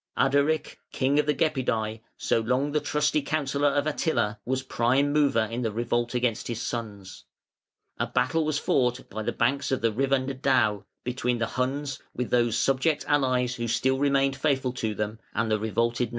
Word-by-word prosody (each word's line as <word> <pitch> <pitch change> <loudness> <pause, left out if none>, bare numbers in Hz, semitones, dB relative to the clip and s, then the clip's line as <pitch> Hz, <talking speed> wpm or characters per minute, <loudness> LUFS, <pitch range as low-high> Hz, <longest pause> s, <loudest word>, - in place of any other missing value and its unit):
Ardaric, 145 +3 +1
king 140 +2 +1
of 150 - +1
the 150 - +3
Gepidæ, 120 -8 0 0.2
so - - +1
long 130 +5 0
the 150 - +2
trusty 150 0 +1
counsellor 140 -1 0
of 145 0 +1
Attila, 145 -9 0
was 130 +1 -1
prime 130 +3 +1
mover 145 -6 +3
in 115 +3 -4
the 115 -3 -1
revolt 120 +2 -1
against 120 -2 0
his 115 -2 -3
sons. 105 -6 -6 0.7
A - - 0
battle 130 +6 +1
was 155 -1 0
fought 125 -3 0
by 110 - -4
the 110 - -1
banks 135 +4 0
of 130 - 0
the 115 0 +2
river 135 +4 +2
Nedao 130 -6 +1 0.2
between 125 -1 -1
the 115 - 0
Huns 135 +4 -2 0.2
(with 125 -1 -3
those 120 -2 +2
subject 135 +4 +1
allies 130 -4 +2
who 120 -1 -3
still 130 +4 +1
remained 135 -1 +2
faithful 135 -3 0
to 110 -4 -2
them) 105 +1 -3 0.2
and 115 -1 0
the 110 - +2
revolted 115 +3 0
nations. - - -16
130 Hz, 180 wpm, -26 LUFS, 115-140 Hz, 0.7 s, the